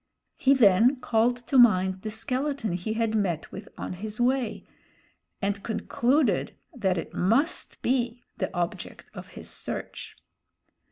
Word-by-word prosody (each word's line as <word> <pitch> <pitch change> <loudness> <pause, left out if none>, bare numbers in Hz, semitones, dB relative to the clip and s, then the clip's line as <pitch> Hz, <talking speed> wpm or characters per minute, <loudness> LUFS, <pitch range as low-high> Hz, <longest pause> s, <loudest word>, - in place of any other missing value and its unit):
He 275 +1 +4
then 230 +2 +5
called 240 0 +2
to 265 - +3
mind 190 -5 +4
the 215 - -4
skeleton 255 0 -2
he 180 +5 -2
had 225 -1 0
met 185 -7 -1
with 200 +2 -9
on - - -5
his 210 +4 -6
way, 250 -1 0 0.8
and 200 0 -1
concluded 235 - 0 0.2
that 190 -7 0
it 165 - -5
must 265 - +1
be 245 -1 0
the - - -2
object 175 -1 -4
of - - -9
his - - -6
search. - - -6
220 Hz, 135 wpm, -27 LUFS, 195-250 Hz, 0.8 s, then